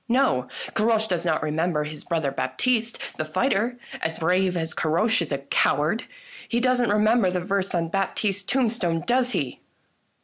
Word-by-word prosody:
No, 150 - +2 0.3
Caroche 220 0 +2
does 175 -2 -1
not 155 -1 +1
remember 155 0 0
his 150 0 -6
brother 160 -5 -1
Baptiste 225 - 0 0.2
the - - -1
fighter, 220 - 0 0.2
as 160 0 -2
brave 180 +2 +1
as 160 -1 -2
Caroche 175 +7 +2
is 165 - -3
a 140 - +1
coward! 150 +7 +1 0.4
He 235 - +1
doesn't 250 -2 +2
remember 215 0 +3
the 180 0 -1
verse 190 +1 -1
on 165 -1 0
Bap 195 +1 -1
tiste's 200 -2 0
tombstone, 210 -7 0
does 250 0 +2
he?" 140 -9 -2
185 Hz, 165 wpm, -24 LUFS, 160-225 Hz, 0.4 s, remember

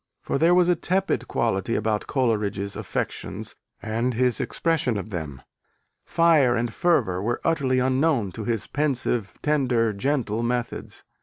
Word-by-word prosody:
For - - -1
there 170 +2 +5
was 180 -1 +4
a 180 - +4
tepid 175 - 0
quality 115 -1 0
about 105 0 -1
Coleridge's 105 -6 0
affections - - -4 0.3
and 115 +3 -1
his 125 0 +1
expression 155 -9 0
of 105 +2 -6
them: 75 -7 -5 0.6
fire 155 -7 +4
and 115 -1 -1
fervour 125 - +1
were 120 +4 -1
utterly 140 -6 +1
unknown 130 - +2
to 110 - -6
his 115 -1 -1
pensive, 125 -7 -1
tender, 125 -7 +2
gentle 115 -1 -1
methods. 120 0 -3
120 Hz, 140 wpm, -24 LUFS, 110-145 Hz, 0.6 s, there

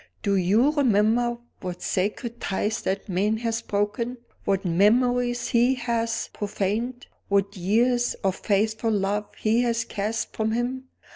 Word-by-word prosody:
"Do 200 -1 +2
you 205 +10 +3
remember 240 -3 +2 0.2
what 180 -1 -6
sacred 225 +5 -2
ties 210 +3 -1
that 195 +3 -2
man 205 +3 +1
has 230 0 -2
broken? 230 +4 -2 0.3
what 195 0 0
memories 240 +6 +2
he 245 +2 +3
has 235 -2 -2
profaned? 210 +4 -2 0.2
what 200 0 +1
years 240 +6 +2
of 190 -1 +1
faithful 220 +3 +1
love 205 0 0
he 225 +2 +2
has 235 -1 0
cast 215 +3 -3
from 220 0 0
him? 250 +3 -2
220 Hz, 135 wpm, -25 LUFS, 200-240 Hz, 0.3 s, you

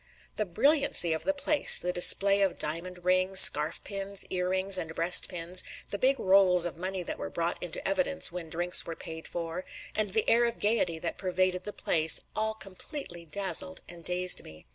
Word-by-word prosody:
The 215 - -3
brilliancy 255 - +2
of 160 - -5
the 290 - +1
place, 290 +1 +3
the 180 +1 -4
display 195 +3 +5
of 195 -2 0
diamond 175 +4 -3
rings, 185 +1 +3
scarf 150 -3 +5
pins, 195 -1 -3
ear 180 -1 -2
rings, 190 +1 +2
and 160 -1 -7
breast 170 +2 +3
pins, 180 0 +1 0.3
the 200 - -5
big 265 +3 +1
rolls 185 -2 +3
of 175 - -5
money 185 +2 -5
that - - -7
were 80 - -6
brought - - -4
into - - -7
evidence 80 - 0
when 170 -2 -8
drinks 175 +2 +4
were 165 - -8
paid 160 0 -10
for, 170 +1 -6 0.3
and 215 -1 -1
the 215 +3 -2
air 235 +1 +3
of 235 0 -4
gaiety 205 -6 -1
that 165 +1 -6
pervaded 185 -1 -2
the 210 - -5
place, 160 -5 +1 0.2
all 220 0 -2
completely 195 - -8
dazzled 185 +1 -2
and 170 -1 -13
dazed 180 +1 +2
me. 80 0 -15
185 Hz, 190 wpm, -27 LUFS, 170-200 Hz, 0.3 s, display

